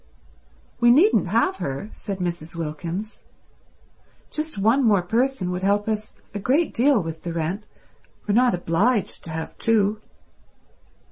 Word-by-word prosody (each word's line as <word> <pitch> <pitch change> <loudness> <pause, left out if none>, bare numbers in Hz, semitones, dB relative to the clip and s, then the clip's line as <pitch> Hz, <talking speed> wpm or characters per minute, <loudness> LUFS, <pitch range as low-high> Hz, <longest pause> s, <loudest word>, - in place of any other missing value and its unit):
"We 240 0 +5
needn't 325 - +5
have 380 0 +1
her," 140 +11 -4
said 200 -2 -5
Mrs. 175 -3 -4
Wilkins. 170 +6 -5 1.1
"Just 310 -5 -4
one 225 +7 +3
more 205 -6 +4
person 230 -1 0
would 180 0 -3
help 205 +2 +1
us 215 -1 -3 0.2
a 205 - -3
great 280 - +1
deal 250 -4 +3
with 165 0 -6
the 170 - -5
rent. 170 +6 -3 0.6
We're 205 - 0
not 245 -1 +4
obliged 190 +6 0
to - - -8
have 160 0 -5
two." 215 -1 +2
205 Hz, 140 wpm, -23 LUFS, 175-240 Hz, 1.1 s, We